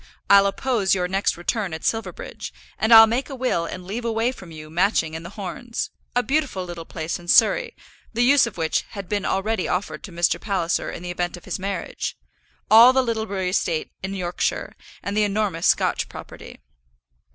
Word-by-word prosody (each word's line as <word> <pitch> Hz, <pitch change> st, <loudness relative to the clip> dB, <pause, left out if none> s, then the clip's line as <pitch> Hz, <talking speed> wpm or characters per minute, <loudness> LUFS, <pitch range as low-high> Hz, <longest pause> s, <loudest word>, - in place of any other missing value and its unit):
I'll 200 Hz, 0 st, +7 dB
oppose 205 Hz, -2 st, +1 dB
your 180 Hz, -1 st, 0 dB
next 195 Hz, 0 st, 0 dB
return 185 Hz, 0 st, -2 dB
at 160 Hz, -, -9 dB
Silverbridge, 205 Hz, -, -4 dB, 0.3 s
and 220 Hz, +3 st, +1 dB
I'll 225 Hz, -1 st, +11 dB
make 245 Hz, +5 st, -2 dB
a 275 Hz, -, -6 dB
will 250 Hz, -10 st, 0 dB
and 180 Hz, +1 st, -7 dB
leave 215 Hz, +6 st, -4 dB
away 230 Hz, +1 st, 0 dB
from 190 Hz, -9 st, -12 dB
you 155 Hz, -1 st, -10 dB
Matching 165 Hz, -2 st, +1 dB
and 160 Hz, -, -6 dB
The 175 Hz, +6 st, -11 dB
Horns, 210 Hz, +5 st, -5 dB, 0.2 s
a 245 Hz, -, +3 dB
beautiful 270 Hz, -10 st, -1 dB
little 170 Hz, -2 st, -7 dB
place 160 Hz, +1 st, -4 dB
in 175 Hz, -, -14 dB
Surrey, -, -, +4 dB, 0.4 s
the 240 Hz, +1 st, +1 dB
use 270 Hz, 0 st, +5 dB
of 230 Hz, -, -9 dB
which 160 Hz, -1 st, 0 dB, 0.2 s
had 195 Hz, -2 st, -6 dB
been 205 Hz, 0 st, -2 dB
already 195 Hz, 0 st, 0 dB
offered 185 Hz, +3 st, -2 dB
to 195 Hz, -, -11 dB
Mr. 170 Hz, 0 st, +1 dB
Palliser 185 Hz, -5 st, -1 dB
in -, -, -7 dB
the 175 Hz, -, -4 dB
event 175 Hz, 0 st, -3 dB
of 175 Hz, -, -15 dB
his 185 Hz, -, -4 dB
marriage; 195 Hz, -1 st, -4 dB, 0.5 s
all 230 Hz, +4 st, +9 dB
the 265 Hz, 0 st, +3 dB
Littlebury 220 Hz, -5 st, -2 dB
estate 165 Hz, -4 st, -1 dB
in 195 Hz, +1 st, -4 dB
Yorkshire, 175 Hz, -2 st, -2 dB, 0.3 s
and 200 Hz, -, -3 dB
the 215 Hz, -, +3 dB
enormous 200 Hz, -4 st, 0 dB
Scotch -, -, +1 dB
property. -, -, -11 dB
195 Hz, 190 wpm, -23 LUFS, 175-225 Hz, 0.5 s, I'll